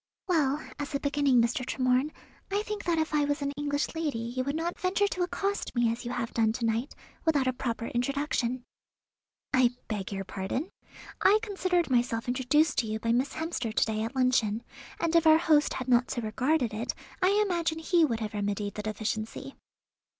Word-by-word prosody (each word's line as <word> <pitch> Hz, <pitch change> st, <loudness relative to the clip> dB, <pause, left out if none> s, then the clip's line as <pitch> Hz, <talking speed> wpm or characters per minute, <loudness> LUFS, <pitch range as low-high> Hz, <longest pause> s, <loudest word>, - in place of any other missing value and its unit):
"Well, 300 Hz, -5 st, +2 dB, 0.2 s
as 290 Hz, 0 st, -4 dB
a -, -, +1 dB
beginning, 285 Hz, -3 st, +3 dB
Mr. 240 Hz, +2 st, 0 dB
Tremorne, 255 Hz, +2 st, +1 dB, 0.4 s
I 405 Hz, +1 st, +1 dB
think 420 Hz, -1 st, -5 dB
that 340 Hz, -2 st, +1 dB
if 315 Hz, 0 st, 0 dB
I 300 Hz, -1 st, +3 dB
was 290 Hz, 0 st, -1 dB
an 280 Hz, -, -1 dB
English 285 Hz, 0 st, -1 dB
lady 320 Hz, -6 st, -2 dB, 0.2 s
you 255 Hz, -, 0 dB
would 280 Hz, +3 st, -2 dB
not 335 Hz, +2 st, -2 dB
venture 385 Hz, +2 st, +2 dB
to 370 Hz, -, -3 dB
accost 395 Hz, +1 st, -2 dB
me 240 Hz, -1 st, +3 dB
as 230 Hz, +1 st, -5 dB
you -, -, -3 dB
have 235 Hz, -2 st, -3 dB
done 220 Hz, -1 st, +2 dB
to 235 Hz, 0 st, -2 dB
night, 230 Hz, +4 st, -1 dB, 0.3 s
without 295 Hz, -5 st, +2 dB
a 255 Hz, -, +1 dB
proper 235 Hz, -2 st, -3 dB
introduction." 250 Hz, 0 st, -1 dB, 0.9 s
"I 250 Hz, -1 st, +4 dB
beg 205 Hz, -3 st, -3 dB
your 195 Hz, -1 st, -3 dB
pardon. 200 Hz, -, -4 dB, 0.5 s
I 405 Hz, +2 st, +6 dB
considered 370 Hz, -7 st, 0 dB
myself 240 Hz, -2 st, +1 dB
introduced 260 Hz, +5 st, +2 dB
to 230 Hz, -, 0 dB
you 215 Hz, 0 st, -2 dB
by 230 Hz, +1 st, 0 dB
Miss 255 Hz, +4 st, +1 dB
Hemster 320 Hz, -8 st, -3 dB
to -, -, +2 dB
day 215 Hz, -1 st, -2 dB
at 225 Hz, +5 st, -3 dB
luncheon; 240 Hz, -4 st, +2 dB, 0.4 s
and 335 Hz, 0 st, 0 dB
if 335 Hz, -1 st, +5 dB
our 315 Hz, 0 st, +8 dB
host 310 Hz, -3 st, +3 dB
had 255 Hz, -, -4 dB
not 245 Hz, -1 st, +3 dB
so 240 Hz, -, -3 dB
regarded 250 Hz, +2 st, +1 dB
it, 225 Hz, +3 st, -3 dB, 0.3 s
I 390 Hz, +3 st, +4 dB
imagine 340 Hz, -4 st, 0 dB
he 335 Hz, +1 st, +3 dB
would 235 Hz, -7 st, +1 dB
have 215 Hz, -1 st, -3 dB
remedied 205 Hz, 0 st, -2 dB
the 210 Hz, -, -4 dB
deficiency." 220 Hz, +5 st, -4 dB
260 Hz, 195 wpm, -29 LUFS, 230-320 Hz, 0.9 s, our